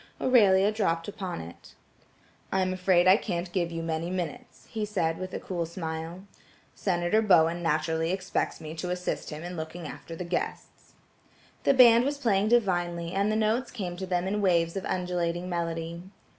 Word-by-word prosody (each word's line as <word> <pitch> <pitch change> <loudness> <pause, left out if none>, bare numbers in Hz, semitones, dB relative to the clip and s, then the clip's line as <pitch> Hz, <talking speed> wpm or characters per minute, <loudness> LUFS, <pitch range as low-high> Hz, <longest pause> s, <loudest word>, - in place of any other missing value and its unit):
Aurelia 205 -5 +5
dropped 170 -6 0
upon 190 - -5
it: 85 +1 -12 0.8
"I 190 - +2
am 185 0 0
afraid 180 -1 +3
I 190 +2 +8
can't 175 -5 -3
give 175 -2 -1
you 165 0 -4
many 165 +1 -2
minutes," 185 +7 -5
he 220 -2 -4
said 180 -6 -1
with 185 0 -5
a - - -4
cool 170 -3 -3
smile. 165 +1 -5 0.5
"Senator 175 +2 +1
Bowen 170 -4 +4
naturally 160 +1 0
expects 185 0 -2
me 155 -1 -7
to 180 - -3
assist 180 0 -3
him 155 +1 -7
in 175 +1 -6
looking 160 +1 -6
after 165 - -8
the 180 - -5
guests." 175 0 -5 0.7
The 275 - +5
band 240 -2 +8
was 285 +2 -1
playing 210 -7 +2
divinely 175 -7 +1
and 200 +3 +1
the - - 0
notes 220 +4 +1
came 185 -7 -5
to 190 +1 -5
them 180 0 0
in 205 +2 -1
waves 170 -3 +2
of 195 - -3
undulating 180 -1 -1
melody. 170 -1 -3
180 Hz, 175 wpm, -28 LUFS, 170-195 Hz, 0.8 s, I